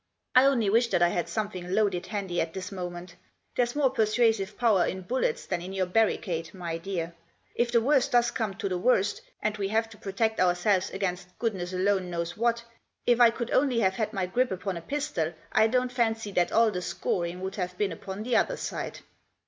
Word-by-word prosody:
I 255 +1 +7
only 255 -6 +3
wish 230 +4 +4
that 175 - +2
I 175 - +5
had 175 -1 -2
something 190 -4 -3
loaded 200 -5 +1
handy 195 -5 -2
at 165 0 -3
this 190 +1 -5
moment, 180 -1 -6 0.4
there's 245 +1 +1
more 280 -3 +3
persuasive 220 -3 +1
power 220 -7 +4
in 185 0 -3
bullets 260 - -1
than 175 - -2
in 185 +2 -7
your 190 -1 0
barricade, 180 -5 0
my 170 -2 -4
dear. 170 -2 -4 0.4
If 240 0 0
the 235 -1 +4
worst 270 +2 +3
does 240 -1 +4
come 215 -4 -2
to 205 0 -3
the 180 -2 -2
worst, 205 -2 +2 0.2
and 210 - 0
we 200 -1 -1
have 225 +2 +1
to 215 - -12
protect 220 +3 -1
ourselves 185 +1 +2
against 180 -2 -4
goodness 190 -6 -2
alone 185 0 +1
knows 170 0 -3
what, 235 +1 +1 0.4
if 240 0 +4
I 235 - +9
could 235 0 -4
only 260 -3 +3
have 190 -2 +3
had 215 +1 -2
my 195 -4 -1
grip 245 +8 +1
upon 190 0 -3
a 170 - -5
pistol 235 - -2 0.2
I 220 0 +5
don't 250 +2 +1
fancy 225 -4 0
that 175 -2 +1
all 230 -1 +4
the 180 -2 -3
scoring 175 0 -2
would 190 +2 -4
have 180 -1 -3
been 205 -2 0
upon 195 +2 -6
the 245 +1 +2
other - - +1
side." - - -5
200 Hz, 210 wpm, -28 LUFS, 180-230 Hz, 0.4 s, I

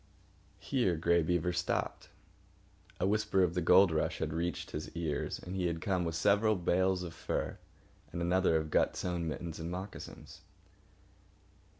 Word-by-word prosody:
Here 120 -11 0
Grey 85 +1 +3
Beaver 90 +1 0
stopped. - - -2 0.9
A - - +1
whisper 105 -1 +2
of 85 -2 +1
the 90 - 0
gold 90 +2 +6
rush 80 - 0
had 75 - -2
reached 85 +2 -3
his 75 - -5
ears, 80 -4 -2
and 90 - -7
he 90 -2 0
had 85 -1 -2
come 90 -2 0
with 80 -1 -2
several 105 +4 +3
bales 90 +1 +1
of 85 -2 -6
furs, 80 - -3 0.5
and 85 - -4
another 90 0 +2
of 80 -1 -1
gut - - +2
sewn 85 -2 -2
mittens 80 +1 -5
and 80 +1 -4
moccasins. 95 +3 -8
90 Hz, 160 wpm, -32 LUFS, 80-95 Hz, 0.9 s, gold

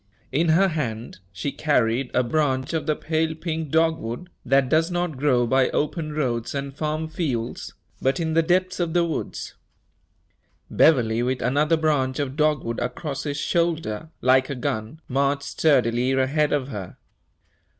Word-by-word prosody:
In 160 +5 +1
her 190 +5 +4
hand 120 - -4
she 95 +10 -3
carried 130 -4 +1
a 125 - +4
branch 130 +1 0
of 160 - -2
the 155 - +2
pale 160 +1 -1
pink 160 -2 -4
dogwood, 160 0 0
that 135 +1 +3
does 160 +5 +2
not 175 -3 -2
grow 130 -3 +2
by 130 +2 +3
open 155 +1 -2
roads 125 -5 -2
and 140 0 -4
farm 155 +1 -2
fields, 140 -8 -3 0.3
but 135 +6 +1
in 160 -1 -1
the 165 - +4
depths 185 +2 +1
of 170 -2 -1
the 175 -1 +3
woods. 165 - -4 1.2
Beverley, 120 -7 +4
with 125 +1 -1
another 150 +6 +2
branch 145 -5 +1
of 140 -2 -2
dogwood 150 -6 0
across 135 +4 -4
his 145 -1 -2
shoulder, 160 -6 -1
like 130 +1 +4
a 140 - -3
gun, 110 +3 -3
marched 140 +2 0
sturdily 130 -4 +2
ahead 140 +3 +1
of 140 -2 0
her. 100 -7 -7
145 Hz, 155 wpm, -24 LUFS, 125-160 Hz, 1.2 s, her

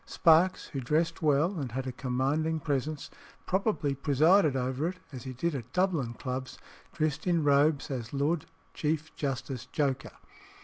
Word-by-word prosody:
Sparkes, 170 +1 +3
who 140 - -4
dressed 160 +6 0
well 155 +4 +2
and 130 -5 -4
had 130 +1 -2
a 130 - -2
commanding 140 +6 0
presence, 145 +1 -2 0.3
probably 190 -7 0
presided 150 +3 +4
over 130 +4 -1
it, 180 +1 -4
as 130 -3 -8
he 130 - -5
did 165 +7 -1
at 125 -4 -6
Dublin 165 -11 +1
clubs, 130 +1 -5 0.3
dressed 155 +1 -1
in 170 -3 +2
robes 145 0 +3
as 120 -4 -4
Lord 145 +3 0 0.3
Chief 155 +1 -2
Justice 130 -2 -3
Joker. 140 -2 -1
145 Hz, 150 wpm, -29 LUFS, 130-160 Hz, 0.3 s, presided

